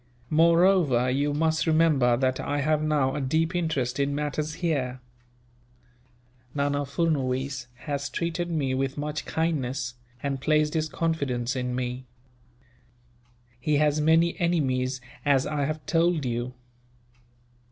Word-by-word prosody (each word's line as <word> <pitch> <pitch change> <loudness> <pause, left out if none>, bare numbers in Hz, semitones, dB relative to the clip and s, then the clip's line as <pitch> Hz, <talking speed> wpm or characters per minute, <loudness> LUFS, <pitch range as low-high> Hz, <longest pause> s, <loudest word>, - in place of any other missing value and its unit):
"Moreover, 165 -6 +4
you 140 +3 +1
must 160 +2 +1
remember 155 -7 +4
that 130 0 0
I 145 0 -1
have 155 +1 +1
now 150 -4 +1
a 145 - -2
deep 160 +6 0
interest 145 -8 -1
in 140 0 +1
matters 150 +1 -2
here. 140 -7 -1 1.6
Nana 145 0 0
Furnuwees 135 -4 -1 0.2
has 140 -2 -2
treated 170 +1 -2
me 145 -6 0
with 135 +1 -1
much 150 +1 -3
kindness, 135 -6 -1 0.3
and 140 -2 -2
placed 150 +1 +2
his 155 -1 0
confidence 140 -7 -1
in 125 -1 -2
me. 125 0 -4 1.5
He 145 +4 +1
has 150 0 +2
many 165 +2 +4
enemies, 130 -7 0 0.2
as 140 -2 +3
I 150 -1 -1
have 155 +1 -4
told 165 -2 +2
you. 120 +1 -3
145 Hz, 125 wpm, -26 LUFS, 130-160 Hz, 1.6 s, Moreover